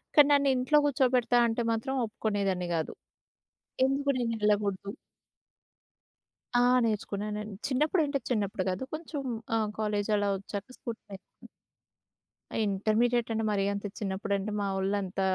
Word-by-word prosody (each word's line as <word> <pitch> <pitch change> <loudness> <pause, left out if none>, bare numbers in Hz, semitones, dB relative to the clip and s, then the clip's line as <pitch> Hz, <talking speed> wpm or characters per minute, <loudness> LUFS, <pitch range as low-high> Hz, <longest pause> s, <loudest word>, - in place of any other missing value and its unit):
కానీ 295 -2 +8
నన్ను 280 -1 +4
ఇంట్లో 255 +4 +3
కూర్చోబెడతా 250 -3 +3
అంటే 230 +1 -1
మాత్రం 230 +4 -1
ఒప్పుకునేదాన్ని 200 -4 -1
కాదు. 160 -1 -2 0.9
ఎందుకు 275 +1 +1
నేను 235 -2 0
యేళ్ళకూడదు 205 -2 +1 1.7
ఆ! - - +5 0.2
నేర్చుకున్నానండి. 210 -1 -3
చిన్నప్పుడంటే 295 +1 +1
చిన్నప్పుడు 200 -5 -1
కాదు. 185 +4 -3
కొంచెం 310 -2 -5 0.3
ఆహ్, 215 -1 +1
కాలేజ్ 210 -1 0
అలా 205 0 +1
వచ్చాక 200 +4 -7
స్కూటీ 235 -2 -6
నే 195 - -6 1.5
ఇంటర్మీడియేట్ 220 +4 +1
అంటే 225 0 -1
మరి 195 -1 +1
అంత 200 - -5
చిన్నప్పుడంటే, 200 0 -2
మావోళ్ళు 195 0 0
అంత 190 0 -4
215 Hz, 115 wpm, -29 LUFS, 200-250 Hz, 1.7 s, కానీ